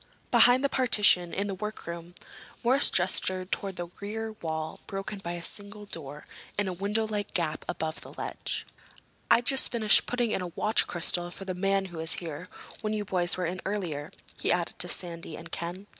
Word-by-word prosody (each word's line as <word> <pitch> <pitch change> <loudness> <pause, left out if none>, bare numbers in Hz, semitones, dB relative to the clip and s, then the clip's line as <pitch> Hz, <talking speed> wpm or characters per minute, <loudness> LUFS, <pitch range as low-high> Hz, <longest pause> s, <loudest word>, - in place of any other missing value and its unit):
"Behind 250 +2 +6
the - - +5
partition—in 205 -8 +4
the 200 - -2
workroom." 175 -4 -6 0.5
Morris 260 +4 +5
gestured 185 +1 +1
toward 195 -2 -1
the 175 -1 -5
rear 220 +2 -4
wall 160 -1 -3
broken 195 +1 -4
by 175 -3 -4
a 170 -1 -6
single 205 +3 -3
door 150 -6 -7 0.3
and 205 -1 +1
a 185 - -1
windowlike 210 +2 -2
gap 160 -4 0
above 160 0 -3
a - - -10
ledge. - - -4 0.6
"I'd 235 +1 +5
just 270 0 +5
finished 220 -3 +4
putting 240 -2 0
in - - 0
a 180 - -3
watch 215 +2 +2
crystal 175 0 +1
for 195 +2 -7
the 185 - -2
man 195 +1 +1
who 175 -3 -9
was 160 0 +1
here 170 +1 -4 0.3
when 215 -1 -1
you 210 -1 -2
boys 180 -2 +2
were 180 - -1
in 180 +2 -3
earlier," 170 -8 -3 0.3
he - - +1
added 175 -1 -1
to 180 - +4
Sandy 170 -3 +1
and 165 0 -10
Ken. 175 +4 -4
185 Hz, 185 wpm, -29 LUFS, 170-210 Hz, 0.6 s, Behind